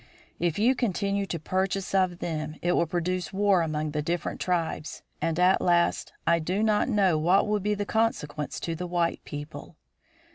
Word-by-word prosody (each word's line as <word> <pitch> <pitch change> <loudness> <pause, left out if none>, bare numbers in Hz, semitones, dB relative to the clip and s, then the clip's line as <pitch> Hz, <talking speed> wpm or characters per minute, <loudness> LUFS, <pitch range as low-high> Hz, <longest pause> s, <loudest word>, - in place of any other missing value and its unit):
If 170 -2 0
you 235 +5 +4
continue 200 -4 -1
to 170 - -3
purchase 190 +4 -1
of 185 -2 +2
them 155 -3 -4
it 175 - +2
will 170 - +2
produce 180 +2 -2
war 200 -2 +3
among 155 -1 -2
the 150 0 -1
different 170 +3 -3
tribes, 165 -3 -2 0.2
and, 165 -1 0
at 180 +1 +4
last, 175 -1 +2
I 170 0 +4
do 185 +6 -1
not 215 +2 +2
know 195 -8 +3
what 180 +7 +3
will 210 0 +1
be 210 +1 0
the 205 0 -3
consequence 155 -10 -1
to 165 - -2
the 180 +2 -4
white 175 -1 -1
people. 145 +2 -8
175 Hz, 180 wpm, -27 LUFS, 165-200 Hz, 0.2 s, you